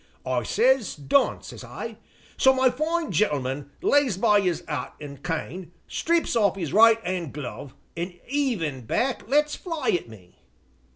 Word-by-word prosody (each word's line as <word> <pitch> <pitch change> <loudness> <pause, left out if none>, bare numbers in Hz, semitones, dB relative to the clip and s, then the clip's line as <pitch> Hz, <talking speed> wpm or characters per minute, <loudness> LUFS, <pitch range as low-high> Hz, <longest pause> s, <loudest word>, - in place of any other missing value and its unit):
I 130 -1 0
says, 240 - +2
'done,' 150 - +1
says - - -9
I. - - -7 0.4
So 265 - +5
my 260 -1 +3
fine 320 +5 -1
gentleman 140 -7 0
lays 285 - +3
by 210 0 +4
'is 180 -4 -1
'at 145 -5 -4
an' 145 -2 -8
cane, 170 +3 -5
strips 335 -5 0
off 200 -4 +3
'is 165 -7 -4
right 225 +1 +7
'and 175 -5 -3
glove, 140 -1 -7 0.2
an' 175 +2 -4
'eavin' 195 - -1
back 250 - -1
lets 295 +2 +3
fly 330 -7 -3
at 175 -9 -1
me. 90 -7 -16
190 Hz, 155 wpm, -25 LUFS, -, 0.4 s, right